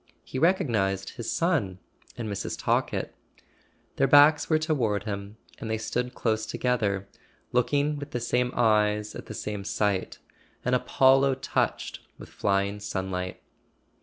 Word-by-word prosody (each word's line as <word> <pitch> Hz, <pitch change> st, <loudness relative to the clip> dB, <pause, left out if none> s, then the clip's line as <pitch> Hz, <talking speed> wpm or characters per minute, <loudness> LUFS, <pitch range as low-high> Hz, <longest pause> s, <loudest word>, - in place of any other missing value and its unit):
He 130 Hz, -, -5 dB
recognized 110 Hz, -, +1 dB
his 115 Hz, -2 st, -5 dB
son 145 Hz, -, 0 dB, 0.4 s
and 115 Hz, -, -4 dB
Mrs. 100 Hz, -2 st, -4 dB
Talkett. -, -, 0 dB, 0.8 s
Their 135 Hz, -, +3 dB
backs 145 Hz, +2 st, +6 dB
were 155 Hz, -, +4 dB
toward 125 Hz, -, 0 dB
him, 100 Hz, 0 st, -5 dB, 0.2 s
and 110 Hz, -, -5 dB
they 110 Hz, -, 0 dB
stood 125 Hz, +3 st, -3 dB
close 110 Hz, -1 st, 0 dB
together, 100 Hz, -6 st, 0 dB, 0.4 s
looking 145 Hz, +5 st, +1 dB
with 145 Hz, 0 st, -7 dB
the 120 Hz, -, -3 dB
same 125 Hz, +1 st, 0 dB
eyes 105 Hz, -2 st, +2 dB
at -, -, -9 dB
the -, -, -7 dB
same 105 Hz, -2 st, -4 dB
sight: 100 Hz, -1 st, -1 dB, 0.5 s
an -, -, +1 dB
Apollo 135 Hz, 0 st, +4 dB
touched 135 Hz, -, -2 dB, 0.2 s
with -, -, -11 dB
flying 100 Hz, +1 st, 0 dB
sunlight. 95 Hz, -2 st, -4 dB
110 Hz, 135 wpm, -27 LUFS, 100-135 Hz, 0.8 s, backs